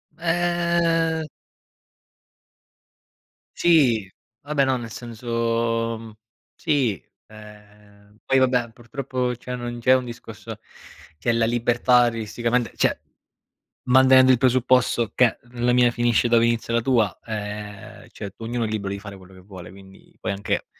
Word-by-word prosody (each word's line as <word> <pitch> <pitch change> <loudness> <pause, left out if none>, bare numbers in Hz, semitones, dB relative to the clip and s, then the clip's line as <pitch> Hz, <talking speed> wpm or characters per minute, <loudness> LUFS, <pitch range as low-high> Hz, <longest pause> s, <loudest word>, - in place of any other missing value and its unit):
Uhm 170 -1 0 2.3
Sì. 130 - +3 0.3
Vabbè 145 -1 0
no, 130 -1 +1
nel 115 -2 -8
senso 115 -1 -2
mhmm, 115 -1 -11 0.4
sì, 130 - 0 0.2
ehm, 105 -1 -17
poi 135 - +2
vabbè, 125 -2 +1
purtroppo 125 +1 -4
cioè 125 +1 -7
non 120 0 -6
c'è 125 +2 +4
un 130 -1 +1
discorso 120 -1 -9 0.6
c'è 115 - 0
la 115 0 +1
libertà 120 +1 +3
artisticamente 115 +1 -2
cioè, - - +1 0.9
mantenendo 130 0 +6
il 130 - +4
presupposto 125 -3 +2
che 125 -3 +3
la 125 0 0
mia 125 -1 +4
finisce 120 0 +1
dove 115 0 +4
inizia 115 0 -1
la 115 - +2
tua, 115 -6 +1
ehm, 105 -2 -7
cioè 100 -2 -8
ognuno 115 +1 -3
è - - -1
libero 105 -2 -3
di 100 - -4
fare 100 -1 -10
quello 95 0 -16
che 95 - -15
vuole, 90 -2 -11
quindi 95 0 -17
puoi - - -3
anche 100 +1 -2
120 Hz, 135 wpm, -23 LUFS, 110-130 Hz, 2.3 s, mantenendo